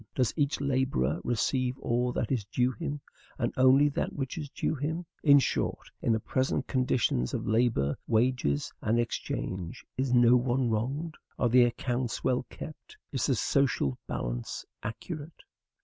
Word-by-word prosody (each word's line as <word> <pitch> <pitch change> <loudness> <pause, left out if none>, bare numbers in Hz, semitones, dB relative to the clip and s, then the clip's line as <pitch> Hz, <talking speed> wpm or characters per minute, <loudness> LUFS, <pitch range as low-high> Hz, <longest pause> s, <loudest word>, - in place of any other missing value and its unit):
Does 125 -5 +1
each 145 -2 +1
laborer 130 - 0
receive 125 +2 0
all 125 0 0
that - - -2
is 125 -6 +1
due 125 +5 +1
him, 145 0 -4 0.4
and - - -1
only 130 +3 +6
that 140 - -2
which 135 -2 -3
is 150 -4 -5
due - - -1
him? 160 +4 -3 0.2
In 145 -2 +7
short, 135 - -1
in - - +1
the 110 - +2
present 130 +4 0
conditions 125 - +1
of - - -3
labor, 110 - +2
wages, 115 - +1
and 115 +2 +2
exchange, 95 -6 -3
is 130 0 0
no 120 0 +6
one 125 0 +1
wronged? 135 +9 -2 0.2
are 120 - +2
the 125 +1 +6
accounts 120 0 -2
well 125 0 +1
kept? 155 - -10
is 130 -4 0
the 135 - +3
social 120 - +1
balance - - -4 0.2
accurate?" 150 - -7
125 Hz, 155 wpm, -29 LUFS, 115-135 Hz, 0.4 s, In